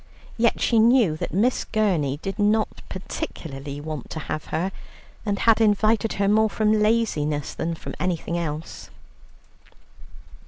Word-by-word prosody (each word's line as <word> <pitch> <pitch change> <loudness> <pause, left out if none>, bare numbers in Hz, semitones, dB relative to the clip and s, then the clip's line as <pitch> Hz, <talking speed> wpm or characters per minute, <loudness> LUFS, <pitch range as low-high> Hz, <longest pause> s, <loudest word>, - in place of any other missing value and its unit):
Yet 235 0 +2
she 230 - +3
knew 230 -7 +5
that - - -4
Miss 220 +9 +1
Gurney 175 - 0
did 195 +1 -4
not 210 +1 +1
particularly 145 -6 -6
want 150 -3 -6
to - - -6
have 155 +1 -4
her, 175 +5 -2 0.6
and 200 -1 +1
had 225 +1 +4
invited 215 +1 +3
her 200 -1 0
more 220 +2 +4
from 215 0 +2
laziness 155 -10 +1
than 165 0 -3
from - - -7
anything 170 -2 -1
else. 160 -2 -5
195 Hz, 135 wpm, -24 LUFS, 155-220 Hz, 0.6 s, knew